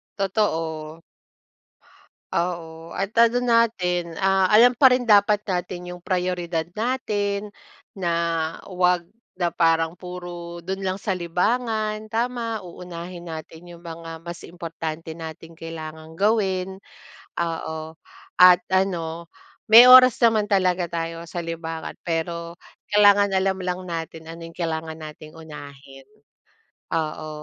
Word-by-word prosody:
Totoo. 165 -6 -2 1.3
Oo, 165 -2 -3
at 195 0 -2
ano 235 +1 +5
natin, 185 -8 +1
ah, 190 0 +3
alam 245 +2 +6
pa 265 -3 +7
rin 250 - +2
dapat 210 -2 +4
natin 180 0 -3
yung 180 - -7
prayoridad 180 -2 -1 0.2
natin, 210 -4 -1 0.5
na 175 -3 0 0.6
huwag 180 -1 +2 0.3
na 175 -2 0
parang 165 0 +1
puro 175 -1 -8
do'n 190 +3 -4
lang 190 +1 -2
sa 190 -3 -1
libangan, 215 +4 -1
tama, 230 0 -2
uunahin 175 0 -9
natin 165 +2 -10
yung 170 - -14
mga 165 -1 -8
mas 170 +1 -8
importante 165 -1 -6
nating 160 0 -9
kailangang 160 -1 -8
gawin. 190 -1 0 0.6
Oo. 160 -1 -3 0.5
At 180 -1 +8
ano, 170 -3 -1 0.4
may 230 +3 +11
oras 255 -1 +9
naman 215 -3 +3
talaga 185 -3 +2
tayo 165 0 -5
sa 170 +1 -5
libangan, 165 -1 -6
pero 170 0 -3 0.4
kailangan 205 0 +6
alam 190 0 0
lang 180 0 -2
natin 165 -2 -6
ano 165 +1 -9
yung 165 - -16
kailangan 160 -2 -3
nating 155 0 -11
unahin. 140 -4 -12 0.9
Oo. 155 -1 -3
175 Hz, 120 wpm, -23 LUFS, 165-200 Hz, 1.3 s, may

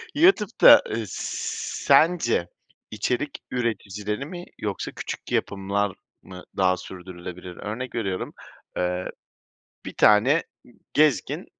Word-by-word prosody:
YouTube'da, 305 - +7
eee, 115 +1 -2
sence 120 - +1 0.4
içerik 125 +6 -2
üreticileri 105 -1 -2
mi 175 +3 -8
yoksa 100 -3 -3
küçük - - -7
yapımlar 100 0 -1 0.3
mı 90 -1 -11
daha 95 -1 +3
sürdürülebilir? 90 -1 -9
Örnek 115 +5 -5
veriyorum, 95 -5 -3 0.4
eee, 90 0 -1 0.8
bir - - -6
tane 120 +10 +5 0.5
gezgin 150 -3 +2
105 Hz, 95 wpm, -25 LUFS, 95-130 Hz, 0.8 s, YouTube'da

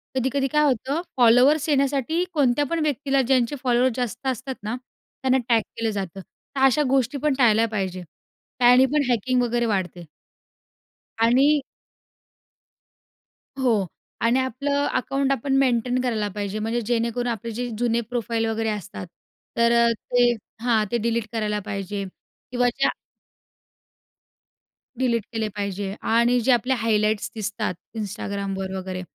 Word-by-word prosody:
कधी-कधी 265 +2 0
काय 300 0 +3
होतं, 275 +3 0 0.2
फॉलोअर्स 255 +6 +5
येण्यासाठी 280 +3 +1
कोणत्या 285 -2 +2
पण 335 +4 -2
व्यक्तीला, 275 -2 +1
ज्यांचे 255 +1 +1
फॉलोअर्स 250 -1 +2
जास्त 245 +1 -3
असतात 260 +1 -3
ना 215 +3 -2
त्यांना 255 +1 -3
टॅग 230 -2 +4 0.2
केलं 225 -1 0
जातं. 195 -2 -5 0.4
तर 270 - -1
अशा 270 +3 +4
गोष्टी 265 0 +1
पण 300 +1 +1
टाळल्या 230 -3 +4
पाहिजे. 190 -4 -3 0.6
त्याने 250 +1 +6
पण 300 - +3
हॅकिंग 250 +2 +1
वगैरे 240 0 0
वाढते. 185 -5 -2 1.2
आणि 275 +6 +4 2.0
हो. 230 -7 +2 0.4
आणि 235 +3 +3
आपलं 280 +3 -1
अकाउंट 275 +2 -1
आपण 275 +1 -1
मेंटेन 250 -1 +2
करायला 225 -4 -1
पाहिजे 205 0 -3
म्हणजे 225 +3 -1
जेणेकरून 235 +1 -1
आपले 230 -1 -3
जे 245 +3 -3
जुने 235 0 +1
प्रोफाइल 230 0 -2
वगैरे 225 0 -1
असतात, 205 -3 -5 0.5
तर 235 0 +4
अ, - - +4
ते 245 +2 +2 0.3
हां, 225 -3 +2
ते 240 - +2
डिलीट 230 0 -1
करायला 210 -2 -1
पाहिजे 200 -1 -4 0.5
किंवा 245 0 +2
ज्या 275 - +4 2.1
डिलीट 235 -4 +1
केले 220 -1 -1
पाहिजे 200 -1 -3
आणि 235 +2 +3
जे 260 - +2
आपले 245 +2 +2
हायलाइट्स 215 -2 +1
दिसतात 210 -2 -3 0.2
Instagramवर 200 -2 -4
वगैरे, 185 -1 -5
235 Hz, 135 wpm, -23 LUFS, 215-260 Hz, 2.1 s, त्याने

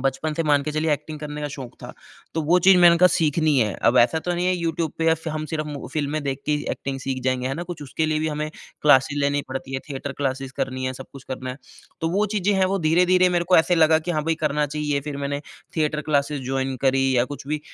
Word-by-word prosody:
बचपन 135 +4 -1
से 165 - 0
मान 145 -2 +3
के 150 - -4
चलिए 155 0 +1
एक्टिंग 155 +1 -4
करने 150 0 -6
का 145 - -2
शौक 130 -4 -8
था। - - -8 0.4
तो 160 - 0
वो 175 +4 +4
चीज़ 190 +2 +6
मैंने 170 -1 +7
कहा 180 - +7
सीखनी 155 -1 +2
है। 105 -4 +1
अब 125 - +2
ऐसा 125 +7 +4
तो 175 +2 -2
नहीं 175 +1 -1
है 185 - +2
यूट्यूब 165 -2 -2
पे 160 0 +3
स 165 0 -7
हम 155 0 -3
सिर्फ़ 155 -1 -3 0.3
फ़िल्में 150 0 -2
देख 135 -1 -2
के 150 - +2
ही 150 0 -1
एक्टिंग 135 0 -4
सीख 135 -1 -3
जाएँगे 130 -1 0
है 135 - -2
ना। 170 - -4
कुछ 175 -3 -7
उसके 155 +3 -2
लिए 155 0 0
भी 155 - 0
हमें 150 0 -3 0.3
क्लासेस 145 0 +4
लेनी 145 0 +1
पड़ती 135 0 -5
है 130 - -2
थिएटर 140 0 -5
क्लासेज़ 135 -1 -2
करनी 130 0 -2
है 130 - -2
सब 135 +1 -9
कुछ 140 -1 -12
करना 130 0 -4
है। 130 - -7 0.4
तो 165 - 0
वो 200 +4 +2
चीज़ें 205 0 +1
हैं 190 - +4
वो 195 +1 0
धीरे-धीरे 180 +3 +4
मेरे 175 - +1
को 185 - +6
ऐसे 165 +2 +4
लगा 160 -1 +5
कि 175 +2 -5
हाँ, 155 -3 -1
भई 165 0 +1
करना 150 0 +1
चाहिए। 150 -1 -2
फिर 145 0 -6
मैंने 140 0 -3 0.4
थिएटर 150 -1 0
क्लासेस 140 -1 +1
जॉइन 135 0 -1
करी 135 -1 +3
या 120 - +4
कुछ 140 0 -9
भी 150 0 -2
150 Hz, 260 wpm, -23 LUFS, 135-160 Hz, 0.4 s, मैंने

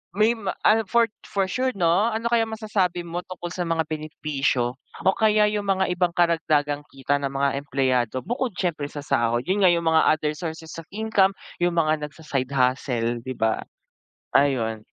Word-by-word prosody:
may 215 +3 +4
ma 200 -4 -3 0.2
ah, 225 +1 +5
for 235 -1 +4 0.2
for 195 -1 -1
sure 255 +7 0
'no, 185 +5 +2
ano 225 +2 -2
kayang 225 -1 +2
masasabi 210 -5 -1
mo 175 +1 -4
tungkol 180 -1 -7
sa 180 - -2
mga 165 -2 0
benepisyo 150 -5 -1 0.3
o 190 - +3
kaya 215 -1 +4
yung 205 -1 -2
mga 190 0 +1
ibang 175 -1 +1
karagdagang 155 -4 +1
kita 135 +1 -1
ng 140 -1 -2
mga 140 0 +1
empleyado 130 -3 0
bukod 245 +3 -1
siyempre 155 -6 -1
sa 145 - -6
sahod? 120 -2 +1
Yun 195 +2 +1
nga 185 - +7
yung 170 -1 0
mga 160 0 +5
other 155 -1 -1
sources 160 -2 -6
of - - -19
income, 205 -2 +2 0.3
yung 175 - +3
mga 155 -2 +2
nagsa-side 140 -4 -4
hustle, 125 -3 0
di 130 - -5
ba? 110 -1 0 0.7
Ayun. 115 -6 +2
165 Hz, 175 wpm, -24 LUFS, 140-195 Hz, 0.7 s, nga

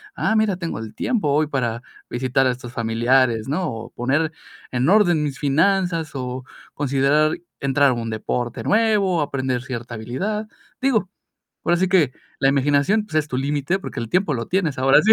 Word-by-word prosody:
ah, 220 - +1
mira, 215 -4 +2
tengo 170 -9 -4
el 110 -1 -8
tiempo 235 -11 0
hoy 155 +2 +3
para 120 -5 -2 0.3
visitar 130 +2 +1
a 125 - +3
estos 125 0 -8
familiares", 115 0 +2
¿no?, 160 +5 -1
o 115 -1 -6
poner 140 +6 0 0.4
en 125 +5 +1
orden 175 -7 +4
mis 140 -3 -3
finanzas 165 +2 +1
o 130 0 -4 0.3
considerar 145 +2 +2 0.2
entrar 140 0 +3
a - - +1
un 115 -1 -4
deporte 120 +2 -3
nuevo, 205 -6 +2
aprender 130 -3 -1
cierta 120 -2 -6
habilidad. 195 - -3 0.3
Digo, 225 -8 +2 0.6
ahora 175 0 +2
sí 190 - +2
que 165 -9 +3 0.3
la 135 - +4
imaginación, 145 +10 +2
pues, 160 - -11
es 155 -1 +1
tu 130 - -2
límite, 145 +6 0
porque 165 -8 -6
el 115 -1 -5
tiempo 180 -5 +2
lo 115 -1 -3
tienes 175 -7 0
ahora 135 +2 +6
sí. 220 +2 +6
140 Hz, 180 wpm, -22 LUFS, 125-180 Hz, 0.6 s, ahora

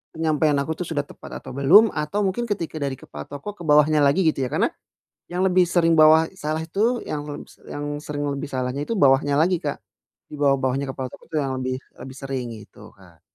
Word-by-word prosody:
penyampaian 155 -2 +1
aku 160 - -4
tuh 180 - -3
sudah 145 -3 -1
tepat - - -10
atau - - -8
belum, 175 - +6
atau 200 +8 -2
mungkin 195 +5 -1
ketika 170 -7 -3
dari 140 -2 -2
kepala 75 - -10
toko 145 +9 -7
ke 175 -4 -12
bawahnya 150 +1 +5
lagi 145 +6 +3
gitu 135 -4 +1
ya, - - -9
karena, - - +1 0.6
yang 180 +1 0
lebih 185 -1 +4
sering 170 -1 +2
bawah 155 +1 +7 0.2
salah 155 +1 -2
itu, 220 +8 0
yang 145 -1 -3
leb 145 - -6 0.3
yang 145 0 -4
sering 145 -1 -4
lebih 140 +2 -4
salahnya 130 +2 -2
itu - - -5
bawahnya 140 -3 +4
lagi 175 +1 +2
Kak. 145 - -3 0.5
Di - - -6
bawah-bawahnya 135 -1 +1
kepala 130 -1 -5
toko - - -14
itu 160 - -8
yang 135 -2 -1
lebih 130 0 -2 0.3
lebih 130 0 -9
sering, 135 -2 -4
gitu 105 - -14
Kak. 90 -4 -20
145 Hz, 205 wpm, -23 LUFS, 135-165 Hz, 0.6 s, bawah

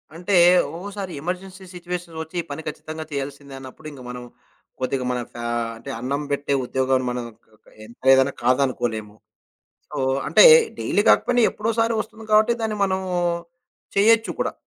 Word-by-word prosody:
అంటే, 180 +4 -3 0.4
ఒక్కోసారి 195 +2 -6
emergency 185 +3 -6
situations 175 -2 -6
ఒచ్చి 160 +3 -16
ఈ - - -11
పని 145 - -5
ఖచ్చితంగా 155 +1 -6
చేయాల్సింద 140 0 -6
అన్నప్పుడు, 135 +4 -11
ఇంక 140 -3 -12
మనం, 125 0 -7 0.6
కొద్దిగా 130 0 -2
మన 125 - -1
ఫ్యా 120 0 -6 0.3
అంటే 115 - -10
అన్నం 140 +4 -2
పెట్టే 140 0 -1
ఉద్యోగాం 130 +1 +1
మనకు 125 -1 -4 0.4
క - - -28 0.2
ఎంత 115 +2 -16
లేదన్నా 135 +1 +5
కాదనుకోలేము. 120 -5 0 0.8
సో, - - -5 0.3
అంటే - - +7 0.3
డైలీ 205 - +1
కాకపోయినా 245 0 +3
ఎప్పుడోసారి 225 +1 0
ఒస్తుంది 220 +1 -14
కాబట్టి 215 +2 +5
దాన్ని 220 -1 -1
మనం 190 -1 -1 1.0
చేయొచ్చు 225 +3 +4
కూడా. - - 0
155 Hz, 145 wpm, -22 LUFS, 130-195 Hz, 1.0 s, అంటే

